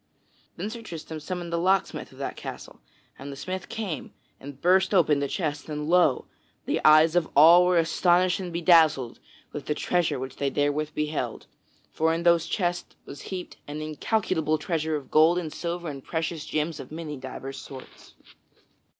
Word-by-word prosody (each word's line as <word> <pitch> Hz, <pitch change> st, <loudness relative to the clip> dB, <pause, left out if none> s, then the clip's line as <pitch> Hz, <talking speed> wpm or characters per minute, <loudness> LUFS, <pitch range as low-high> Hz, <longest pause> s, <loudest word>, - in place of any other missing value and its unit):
Then 200 Hz, +5 st, -4 dB
Sir 235 Hz, 0 st, -7 dB
Tristram 165 Hz, -6 st, -7 dB
summoned 175 Hz, +1 st, -5 dB
the 170 Hz, -, +1 dB
locksmith 190 Hz, +2 st, 0 dB
of -, -, -17 dB
that -, -, -4 dB
castle; -, -, -9 dB, 0.4 s
and 140 Hz, +1 st, -7 dB
the -, -, -7 dB
smith 185 Hz, +5 st, -6 dB
came 195 Hz, -, -5 dB, 0.2 s
and 140 Hz, -1 st, -10 dB
burst 190 Hz, +4 st, +3 dB
open 155 Hz, -5 st, +4 dB
the 140 Hz, -, -1 dB
chests; 150 Hz, -3 st, -3 dB
and 150 Hz, 0 st, -4 dB
lo! 170 Hz, -5 st, +3 dB, 0.4 s
the -, -, -1 dB
eyes 155 Hz, +2 st, +6 dB
of 175 Hz, -2 st, +2 dB
all 170 Hz, +5 st, +8 dB
were 180 Hz, -1 st, +3 dB
astonished 175 Hz, +2 st, +2 dB
and 180 Hz, -2 st, -5 dB
bedazzled 160 Hz, -7 st, +3 dB, 0.3 s
with 145 Hz, -, -7 dB
the 150 Hz, -, 0 dB
treasure 175 Hz, +1 st, 0 dB
which 130 Hz, 0 st, -7 dB
they 140 Hz, -, 0 dB
therewith 145 Hz, +2 st, -1 dB
beheld; 150 Hz, -6 st, -3 dB, 0.5 s
for 160 Hz, +1 st, +1 dB
in 170 Hz, -, -3 dB
those 170 Hz, -1 st, +4 dB
chests 175 Hz, -3 st, -2 dB
was 140 Hz, -, -10 dB
heaped 185 Hz, -2 st, -6 dB
an 150 Hz, +1 st, -5 dB
incalculable 155 Hz, 0 st, -1 dB
treasure 160 Hz, 0 st, -2 dB
of 140 Hz, -4 st, -7 dB
gold 160 Hz, +3 st, +5 dB
and 160 Hz, -4 st, -4 dB
silver 175 Hz, 0 st, -4 dB
and 140 Hz, -3 st, -6 dB
precious 160 Hz, -1 st, -3 dB
gems 155 Hz, +1 st, -2 dB
of -, -, -9 dB
many 155 Hz, -1 st, -6 dB
divers 135 Hz, 0 st, -7 dB
sorts. 130 Hz, -2 st, -12 dB
160 Hz, 175 wpm, -26 LUFS, 150-175 Hz, 0.5 s, all